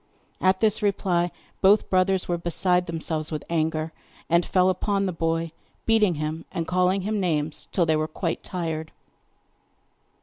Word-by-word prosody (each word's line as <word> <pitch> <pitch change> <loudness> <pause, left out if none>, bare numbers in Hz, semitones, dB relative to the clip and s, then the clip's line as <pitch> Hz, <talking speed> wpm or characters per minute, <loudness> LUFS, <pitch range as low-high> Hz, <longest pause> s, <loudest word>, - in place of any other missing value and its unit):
At 185 0 +3
this 220 -1 +2
reply 185 -4 +1 0.3
both 200 +2 +5
brothers 185 0 +2
were 175 -1 -1
beside 180 +1 +1
themselves 160 -1 -2
with 155 - -3
anger, 160 -1 0 0.4
and 170 +1 +5
fell 185 0 +3
upon 195 +2 0
the 185 - 0
boy, 165 0 -1 0.3
beating 215 -6 +3
him, 155 +2 -3
and 170 -3 -2
calling 185 +2 +2
him 210 +2 -1
names, 155 -4 -1
till 175 - +2
they 160 -1 +2
were 155 0 0
quite 165 +2 -3
tired. 160 -4 -4
175 Hz, 155 wpm, -25 LUFS, 160-190 Hz, 0.4 s, both